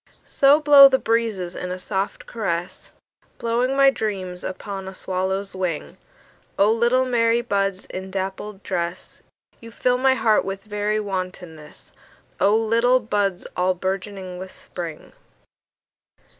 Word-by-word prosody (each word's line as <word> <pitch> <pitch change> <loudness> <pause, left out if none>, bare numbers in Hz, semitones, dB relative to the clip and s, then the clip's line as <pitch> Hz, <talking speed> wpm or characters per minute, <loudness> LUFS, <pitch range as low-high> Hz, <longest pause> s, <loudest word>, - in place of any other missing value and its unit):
So 280 +1 +4
blow 285 -2 +9
the 265 - +3
breezes 225 -7 -1
in 180 - -5
a 180 - -4
soft 190 +2 -3
caress, 180 -6 -4 0.5
Blowing 240 +3 0
my 275 0 +6
dreams 190 -7 -4
upon 195 0 -6
a 190 - -8
swallow's 190 +2 -2
wing;O 185 +3 -3
little 240 +3 +2
merry 235 -1 +2
buds 200 -4 -1
in 190 +1 -7
dappled 195 +1 -5
dress, 175 0 -4 0.4
You 230 - -11
fill 250 +2 0
my 265 0 +4
heart 220 -4 +3
with 195 0 -5
very 210 0 -1
wantonness—O 185 0 -4
little 230 +3 +3
buds 205 -5 -1
all 180 +1 +1
bourgeoning 190 0 -4
with 185 0 -8
Spring! 165 -3 -8
200 Hz, 125 wpm, -22 LUFS, 185-230 Hz, 0.5 s, blow